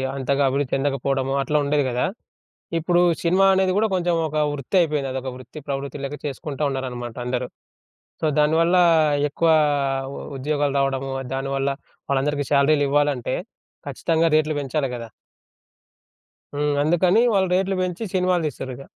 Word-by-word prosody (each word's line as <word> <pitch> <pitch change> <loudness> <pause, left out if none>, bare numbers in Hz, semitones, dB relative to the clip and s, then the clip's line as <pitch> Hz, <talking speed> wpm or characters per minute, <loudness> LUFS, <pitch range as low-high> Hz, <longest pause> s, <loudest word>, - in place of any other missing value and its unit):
అంతగా 140 +1 0
అభివృద్ధి 140 0 -1
చెందకపోవడము 135 -1 0
అట్లా 150 +3 0
ఉండేది 145 0 +1
గదా! 125 +1 0 0.7
ఇప్పుడు 175 +2 +2 0.2
సినిమా 185 +3 +3
అనేది 190 -1 +2
గూడా 220 +2 +2
కొంచెం 175 -2 +1
ఒక 155 - -6 0.2
వృత్తి 145 +6 -3
అయిపోయింది. 150 -5 0
అదొక 130 0 -4
వృత్తి 130 +3 -11
ప్రవృత్తి 140 +1 -4
లెక్క 145 +2 -5
చేసుకుంటా 145 +1 -5
ఉన్నారనమాట 125 -3 -5
అందరు. 125 0 -2 0.7
సో, - - 0
దానివల్ల 160 +4 +3 0.6
ఎక్కువ 165 +3 +1 0.7
ఉ - - -7 0.2
ఉద్యోగాలు 145 0 -1
రావడము, 135 0 -1 0.2
దానివల్ల 135 0 -1 0.4
వాళ్ళందరికీ 145 +1 0
శాలరీలివ్వాలంటే 145 -2 +2 0.5
ఖచ్చితంగా 165 0 +1
రేట్లు 155 -1 +1
పెంచాలి 135 0 -2
గదా! 115 -2 -8 1.5
హ్మ్. 145 0 0
అందుకని 175 +7 +3
వాళ్ళు 190 -2 +2
రేట్లు 190 +1 0
బెంచి 180 +4 -3
సినిమాలు 180 -2 +1
తీస్తుర్రిగ. 130 -2 -7
145 Hz, 130 wpm, -22 LUFS, 135-165 Hz, 1.5 s, సినిమా